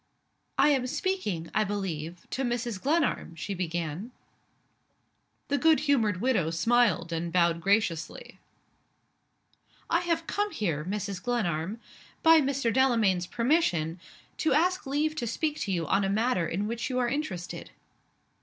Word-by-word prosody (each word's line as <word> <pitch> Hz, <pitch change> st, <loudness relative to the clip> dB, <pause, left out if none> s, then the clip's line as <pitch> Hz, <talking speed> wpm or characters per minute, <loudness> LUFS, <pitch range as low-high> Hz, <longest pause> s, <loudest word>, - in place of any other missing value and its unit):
"I -, -, +5 dB
am 265 Hz, -3 st, +2 dB
speaking, 260 Hz, -, -2 dB
I 215 Hz, -, +3 dB
believe, 180 Hz, -5 st, -4 dB
to 265 Hz, -, -2 dB
Mrs. 240 Hz, -5 st, -2 dB
Glenarm?" 290 Hz, -, 0 dB
she 195 Hz, +5 st, -4 dB
began. 175 Hz, +2 st, -3 dB, 1.4 s
The 285 Hz, 0 st, 0 dB
good 320 Hz, -1 st, +4 dB
humored 230 Hz, -10 st, +2 dB
widow 230 Hz, -11 st, +2 dB
smiled 170 Hz, -1 st, +2 dB
and 165 Hz, +1 st, -2 dB
bowed 170 Hz, -1 st, +2 dB
graciously. 195 Hz, -4 st, -1 dB, 1.5 s
"I 335 Hz, -, +4 dB
have 335 Hz, -2 st, -1 dB
come 415 Hz, +4 st, -1 dB
here, 170 Hz, -, -2 dB
Mrs. 195 Hz, +1 st, -4 dB
Glenarm 205 Hz, -4 st, -1 dB, 0.4 s
by 325 Hz, -1 st, +7 dB
Mr. 270 Hz, -4 st, 0 dB
Delamayn's 225 Hz, -9 st, +3 dB
permission 210 Hz, -, +1 dB, 0.4 s
to 315 Hz, -4 st, +1 dB
ask 355 Hz, +2 st, +1 dB
leave 295 Hz, +3 st, 0 dB
to 240 Hz, -, -2 dB
speak 300 Hz, +6 st, -2 dB
to 200 Hz, -, -2 dB
you 170 Hz, -3 st, 0 dB
on 195 Hz, +6 st, +2 dB
a 195 Hz, -, 0 dB
matter 210 Hz, -4 st, +1 dB
in 190 Hz, +6 st, -2 dB
which 230 Hz, +5 st, -3 dB
you 255 Hz, -, -2 dB
are 250 Hz, -1 st, +2 dB
interested." 235 Hz, -, -4 dB
215 Hz, 140 wpm, -28 LUFS, 175-275 Hz, 1.5 s, by